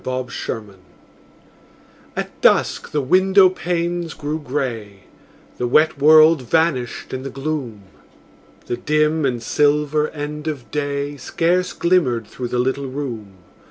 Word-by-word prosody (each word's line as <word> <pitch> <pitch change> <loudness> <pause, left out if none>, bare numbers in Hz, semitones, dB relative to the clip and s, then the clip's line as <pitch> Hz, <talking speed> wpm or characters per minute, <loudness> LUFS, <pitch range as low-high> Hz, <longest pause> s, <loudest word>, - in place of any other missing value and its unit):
FORGIVENESS 125 -5 -5 1.4
At - - -5
dusk - - +2
the 150 - -1
window 190 +6 +5
panes 175 -2 -3
grew 150 +1 -4
grey; 120 -8 -4 0.6
The 125 - 0
wet 155 +3 +3
world 155 +1 +6
vanished 130 -3 -1
in 130 - -3
the 135 - -6
gloom; 135 -6 -4 0.8
The 120 - -3
dim 155 0 +1
and 120 -3 -3
silver 150 +2 +1
end 150 +1 -6
of 145 -5 -5
day 145 0 -3
Scarce 175 +6 0
glimmered 135 -11 +1
through 125 +4 -6
the 125 - -3
little 130 +2 -1
room. 125 -7 -6
145 Hz, 125 wpm, -20 LUFS, 125-155 Hz, 1.4 s, world